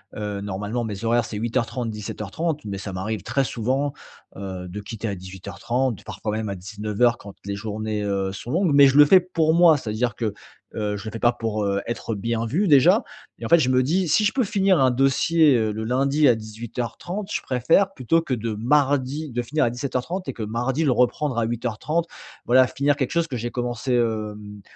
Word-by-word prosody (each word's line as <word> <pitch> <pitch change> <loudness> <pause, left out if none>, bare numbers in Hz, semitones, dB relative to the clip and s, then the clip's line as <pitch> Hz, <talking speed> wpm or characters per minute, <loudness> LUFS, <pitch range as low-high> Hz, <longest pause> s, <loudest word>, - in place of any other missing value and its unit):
Heu, 105 -1 -4
normalement, 105 +4 -3
mes 105 0 -5
horaires, 120 0 +3
c'est 110 -1 -6
08:30, 120 +1 -2
17:30 110 - -4
mais 100 -1 -4
ça 95 0 -6
m'arrive 105 +4 -4
très 135 +3 0
souvent, 135 +5 -1 0.4
heu, 95 -2 -6
de 105 +4 -6
quitter 110 +2 -6
à 100 - -2
18:30, 100 +7 -3
parfois 105 +1 -5
même 110 -1 -3
à 100 - -3
19:00 105 +5 0
quand 100 -1 -12
les 100 0 -3
journées, 110 0 -3
heu, 100 -1 -1
sont 120 +5 -7
longues. 175 -1 +2
Mais 140 -1 +8
je 135 - +2
le 150 - +9
fais 185 +5 +7
pour 165 -3 +1
moi, 170 -3 +6
c'est-à-dire 110 -1 -2
que, 110 -4 -2 0.4
heu, 105 -1 -2
je 100 - -9
le 110 - -5
fais 115 - -6
pas 120 +1 +4
pour, 110 -3 -3
heu, 100 0 0
être 115 -1 -4
bien 115 +2 -2
vu 180 - +1
déjà. 140 -4 +5 0.3
Mais 115 - -7
en - - -4
fait, 170 - +7
je 130 - +1
me 130 0 +3
dis: 175 +6 +1
«Si 210 +8 +3
je 210 - +2
peux 260 -2 +2
finir 195 -5 +2
un 130 -1 +5
dossier, 135 +3 +3
heu, 110 -2 +1
le 110 +1 -4
lundi 135 +5 +2
à 120 - +6
18:30, 120 - -6
je - - -1
préfère 165 +10 +2
plutôt 165 +4 +1
que 135 - -2
de 115 -1 -2
mardi, 140 +4 +1
de 120 - -3
finir 150 +5 0
à - - +2
17:30 135 +8 -3
et 135 - -3
que - - -8
mardi, 125 +8 -1
le 140 - +3
reprendre 125 +1 +1
à 115 - +2
08:30». 125 +8 -2 0.4
Voilà, 130 +1 +5
finir 140 +5 +1
quelque 135 -4 -2
chose 170 -1 +1
que 130 -5 -4
j'ai 120 +1 -4
commencé, 120 +1 -2
hem, 105 -3 -2
120 Hz, 215 wpm, -23 LUFS, 105-140 Hz, 0.4 s, le